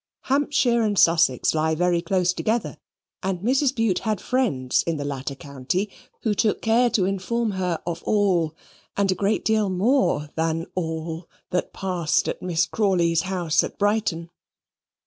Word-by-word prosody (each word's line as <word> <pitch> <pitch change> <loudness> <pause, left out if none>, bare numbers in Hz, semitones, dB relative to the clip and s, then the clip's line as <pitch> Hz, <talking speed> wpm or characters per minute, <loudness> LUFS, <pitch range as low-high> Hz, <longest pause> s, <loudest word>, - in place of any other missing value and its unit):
Hampshire 270 -3 +2
and 210 -2 0
Sussex 165 -8 +4
lie 160 0 +1
very 175 +1 +1
close 180 -1 +1
together, 220 +4 -2 0.4
and 185 -2 -2
Mrs. 265 +5 +2
Bute 225 -6 +1
had 215 -3 -2
friends 200 - 0
in 165 -2 0
the 145 - -4
latter 140 0 -4
county 145 +8 -3 0.3
who 220 - +1
took 210 +1 +1
care 235 +2 +3
to 195 -5 +1
inform 210 +4 -1
her 180 -3 -2
of 170 -1 -4
all, 180 -7 +1 0.4
and 200 -1 +2
a - - +3
great 200 +3 -1
deal 215 -2 +2
more 185 - +1
than 165 0 -1
all, 160 -1 -4 0.2
that 180 - -1
passed 180 -4 0
at - - -3
Miss 175 -1 +1
Crawley's 175 -6 +1
house 175 -5 +1
at - - -6
Brighton. 200 -5 0
185 Hz, 155 wpm, -24 LUFS, 165-215 Hz, 0.4 s, Sussex